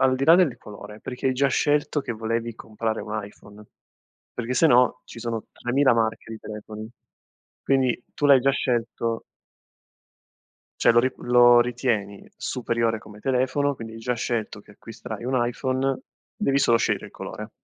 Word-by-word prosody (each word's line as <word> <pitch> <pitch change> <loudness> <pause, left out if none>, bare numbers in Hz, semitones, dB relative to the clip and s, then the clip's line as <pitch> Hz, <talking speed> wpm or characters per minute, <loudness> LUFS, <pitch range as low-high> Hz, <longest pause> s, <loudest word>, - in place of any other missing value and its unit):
al 130 -1 +4
di 135 - -1
là 165 - +8
del 175 -9 +3
colore, 105 +1 -11
perché 130 +1 -5
hai 130 - +3
già 135 +2 +2
scelto 145 +2 +1
che 120 - -4
volevi 115 +1 -3
comprare 110 0 -4
un 110 0 -4
iPhone? 105 +1 -14 0.7
Perché 120 +1 -3
se 165 - +5
no, 125 -1 +4
ci - - -11
sono 115 -1 -4
3.000 130 +2 +2
marche 110 0 -1
di 110 - -7
telefoni, 110 0 -8 0.7
quindi 130 -3 +1
tu 145 - +1
l'hai 135 -2 +7
già 135 - +3
scelto 115 -3 -1 1.6
cioè, - - +6
lo - - +6
ri 130 +2 0
lo 120 0 +6
ritieni 120 -5 -1
superiore 115 -2 -1
come 105 -1 -14
telefono, 135 +3 +1
quindi 115 -2 -9
hai 115 - -9
già 125 +2 -1
scelto 110 -3 -3
che - - -19
acquisterai 115 +1 -9
un 130 +1 0
iPhone. 130 +2 -1 0.4
Devi 140 0 +1
solo 115 -4 +4
scegliere - - 0
il - - -10
colore. - - -7
120 Hz, 165 wpm, -24 LUFS, 110-130 Hz, 1.6 s, là